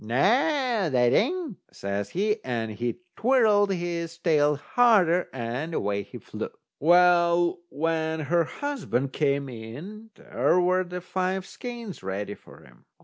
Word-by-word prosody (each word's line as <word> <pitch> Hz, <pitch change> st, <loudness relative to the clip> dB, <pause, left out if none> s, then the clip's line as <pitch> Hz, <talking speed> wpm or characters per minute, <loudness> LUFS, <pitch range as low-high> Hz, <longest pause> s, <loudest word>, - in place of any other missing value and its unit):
"Noo, 110 Hz, -, -11 dB
that 215 Hz, -, +2 dB
ain't," 340 Hz, -, 0 dB
says 100 Hz, +1 st, -4 dB
he, 210 Hz, +4 st, -1 dB
and 115 Hz, -3 st, -3 dB
he 120 Hz, +7 st, -4 dB
twirled 215 Hz, -5 st, +3 dB
his 170 Hz, -2 st, -3 dB
tail 150 Hz, -3 st, +2 dB
harder, 180 Hz, -, +3 dB
and 130 Hz, +6 st, -4 dB
away 100 Hz, 0 st, -1 dB
he -, -, -10 dB
flew. -, -, -6 dB, 0.3 s
Well, 175 Hz, +1 st, +4 dB
when 160 Hz, +1 st, -1 dB
her 170 Hz, +2 st, +1 dB
husband 185 Hz, -, -3 dB
came 140 Hz, -2 st, 0 dB
in, 145 Hz, -, -9 dB
there 180 Hz, -, +1 dB
were 185 Hz, +1 st, +2 dB
the 180 Hz, 0 st, -6 dB
five 185 Hz, +1 st, -2 dB
skeins 235 Hz, -5 st, -8 dB
ready 100 Hz, +2 st, -4 dB
for -, -, -16 dB
him. -, -, -20 dB
170 Hz, 135 wpm, -26 LUFS, 135-200 Hz, 0.3 s, Well